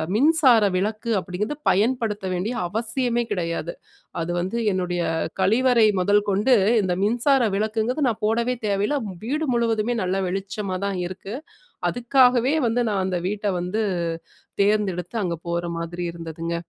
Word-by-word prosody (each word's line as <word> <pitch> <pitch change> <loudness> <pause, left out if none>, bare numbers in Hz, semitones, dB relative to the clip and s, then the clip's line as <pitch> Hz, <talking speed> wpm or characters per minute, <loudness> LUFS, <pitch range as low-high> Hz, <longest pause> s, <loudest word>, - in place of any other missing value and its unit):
மின்சார 275 -2 +5 0.2
விளக்கு 215 +4 -2
அப்டிங்கிறது 200 +9 -4
பயன்படுத்த 215 -1 +1
வேண்டிய 185 +7 -2
அவசியமே 235 +4 -1
கிடையாது. 170 -3 -2 0.5
அது 165 +1 -2
வந்து 190 +6 -3 0.2
என்னுடைய 180 -1 -1 0.4
கழிவறை 230 +3 +4
முதல் 205 +3 +3
கொண்டு 205 +6 +3 0.3
இந்த 185 -2 0
மின்சார 245 +6 +3
விளக்குங்கிறது 220 +7 0
நான் 225 -1 -4
போடவே 235 +3 +1
தேவையில்ல. 205 +8 +1 0.3
வீடு 300 +6 -1
முழுவதுமே 230 0 +1
நல்ல 185 +1 -1
வெளிச்சமா 195 +1 -3
தான் 195 -2 -2
இருக்கு. 190 +4 -7 0.5
அதுக்காகவே 250 +2 +3
வந்து 240 +2 +1
நான் 195 -3 0
அந்த 180 -2 -1
வீட்ட 210 0 -3
வந்து 180 +5 -2 0.8
தேர்ந்தெடுத்து, 200 -2 0
அங்க 175 -2 -1
போற 170 0 -1
மாரி 170 +1 -4
இருந்ததுங்க. 165 0 -5
210 Hz, 130 wpm, -23 LUFS, 185-235 Hz, 0.8 s, மின்சார